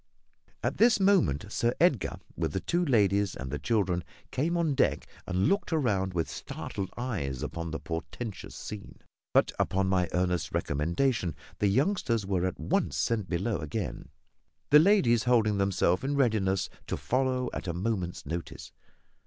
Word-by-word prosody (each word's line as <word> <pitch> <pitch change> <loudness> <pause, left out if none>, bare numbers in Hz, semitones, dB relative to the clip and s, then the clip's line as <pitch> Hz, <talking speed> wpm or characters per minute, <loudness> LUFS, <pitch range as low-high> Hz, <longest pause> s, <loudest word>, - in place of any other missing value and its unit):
At - - -1
this 230 -1 +5
moment 120 - +3
Sir 120 +2 +1
Edgar, 155 - +2 0.2
with - - -2
the - - 0
two 175 +1 0
ladies 100 - +2
and 65 -1 -6
the 75 - -3
children, 95 -7 0 0.3
came 165 +6 0
on 165 -4 +1
deck - - +1 0.2
and 90 +1 +1
looked 200 -2 +1
round 100 - +1
with 85 -2 0
startled 95 -1 -5
eyes 90 - -3
upon 85 0 -4
the 80 - -4
portentous 95 +6 -6
scene; 105 -2 -8 0.3
but, - - +4
upon 95 0 +1
my 90 -2 +2
earnest 90 -2 0
recommendation, 85 - 0 0.2
the 105 - +3
youngsters 120 - +1
were 95 -2 0
at 95 - -5
once - - 0
sent 110 -5 0
below 95 +4 -1
again, 75 -3 -4 0.6
the 150 - +9
ladies 150 - +4
holding 110 -5 +3
themselves 95 0 +2
in 140 +2 0
readiness 110 -8 +2 0.2
to - - -2
follow 130 -1 0
at - - -5
a 85 - -1
moment's 90 -2 -2
notice. 85 +3 -6
100 Hz, 155 wpm, -29 LUFS, 90-130 Hz, 0.6 s, the